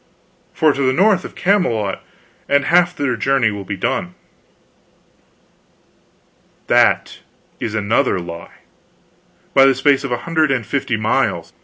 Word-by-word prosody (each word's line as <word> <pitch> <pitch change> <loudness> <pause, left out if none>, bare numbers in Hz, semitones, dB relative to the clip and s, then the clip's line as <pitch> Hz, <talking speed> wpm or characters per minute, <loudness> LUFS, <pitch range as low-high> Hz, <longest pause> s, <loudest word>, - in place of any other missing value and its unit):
"Far 155 -2 +2
to 140 - -4
the 130 -1 +2
north 190 +3 +2
of - - -10
Camelot, 175 - 0 0.5
and 140 -1 +2
half 175 +1 +3
their 135 -4 -1
journey 120 0 +1
will 100 -1 -6
be 95 +1 -6
done." 90 -1 -3 2.5
"That - - +2 0.4
is 110 -1 -4
another 110 +1 +1
lie, 85 -1 -10 0.9
by 135 - +6
the 135 -1 +4
space 140 +1 +2
of 135 - -5
a 120 - 0
hundred 160 -2 +1
and 130 -5 -1
fifty 130 -2 -2
miles. 110 0 -1
135 Hz, 135 wpm, -18 LUFS, 110-150 Hz, 2.5 s, by